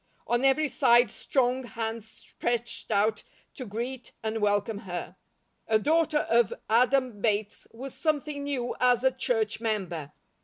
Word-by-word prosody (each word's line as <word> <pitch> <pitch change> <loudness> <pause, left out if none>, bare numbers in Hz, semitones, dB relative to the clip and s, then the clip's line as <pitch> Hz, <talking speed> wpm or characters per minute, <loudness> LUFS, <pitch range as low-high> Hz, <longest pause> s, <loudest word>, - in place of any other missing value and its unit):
On 240 +2 +1
every 275 +3 +4
side 240 -4 +4
strong 260 0 0
hands 225 -2 -5
stretched 235 0 -4
out 215 0 +2 0.3
to 255 - -7
greet 240 +5 -5
and 220 0 -2
welcome 205 +1 +1
her. 180 -3 -6 0.5
A 220 - +4
daughter 310 +4 +2
of 230 -3 +3 0.2
Adam 250 -1 +2
Bates 210 -1 -1
was 260 +3 -8
something 300 -2 -1
new 265 -4 -2
as 250 -1 +4
a 265 - +4
church 225 -4 -1
member. 180 -10 -2
235 Hz, 140 wpm, -28 LUFS, 215-260 Hz, 0.5 s, every